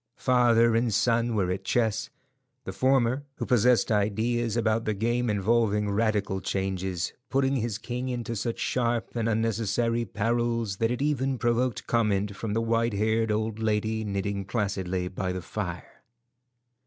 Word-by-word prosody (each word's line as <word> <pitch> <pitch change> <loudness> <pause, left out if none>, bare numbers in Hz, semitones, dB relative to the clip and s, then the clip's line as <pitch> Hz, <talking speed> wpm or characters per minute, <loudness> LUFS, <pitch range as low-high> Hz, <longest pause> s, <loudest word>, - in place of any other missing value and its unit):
Father 115 -2 +4
and 115 0 +2
son 115 +2 +2
were 95 -3 +1
at 95 - -3
chess, 115 -1 0 0.5
the - - -5
former, 130 0 +2
who - - -4
possessed 125 0 +3
ideas 110 +3 0
about 115 -1 +1
the 110 - 0
game 120 +3 0
involving 105 0 +1
radical 105 -2 0
changes, 95 -3 -2 0.2
putting 135 0 +1
his 115 -3 -2
king 125 +3 -4
into 120 -1 -3
such 115 +2 -2
sharp 120 -2 -1
and 115 -1 0
unnecessary 115 +1 0
perils 115 0 -1
that 115 +1 +1
it 125 +3 -1
even 135 -3 0
provoked 120 0 0
comment 105 -3 +1
from 105 0 -4
the 115 - +1
white 115 0 +1
haired 110 +2 +1
old 110 +1 -1
lady 110 0 0
knitting 100 -1 -2
placidly 95 -2 -2
by 90 0 -3
the 90 - -3
fire. - - -6
115 Hz, 150 wpm, -27 LUFS, 105-120 Hz, 0.5 s, Father